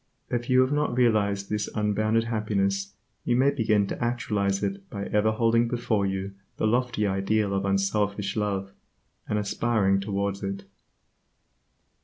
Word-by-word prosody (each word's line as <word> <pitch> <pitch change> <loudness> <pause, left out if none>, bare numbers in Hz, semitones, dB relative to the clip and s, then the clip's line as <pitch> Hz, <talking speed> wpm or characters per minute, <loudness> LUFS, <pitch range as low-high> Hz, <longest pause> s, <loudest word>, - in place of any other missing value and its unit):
If 120 0 -2
you 130 0 +5
have 130 +1 +2
not 145 -4 0
realized 100 -5 +2
this 105 0 -2
unbounded 110 +2 +1
happiness 100 -3 -1 0.3
you 120 - +1
may 135 +3 +4
begin 110 -6 +2
to 100 - -4
actualize 105 -5 0
it 195 0 -3
by 100 -3 -5
ever 105 +1 +2
holding 115 +1 +2
before 115 -4 0
you 95 0 -3 0.2
the - - 0
lofty 120 -1 +1
ideal 100 +1 0
of 100 0 -1
unselfish 100 0 0
love, 100 -2 -2 0.6
and 105 - +1
aspiring 105 -1 +1
towards 100 0 -2
it. 100 0 -4
105 Hz, 145 wpm, -26 LUFS, 100-115 Hz, 0.6 s, you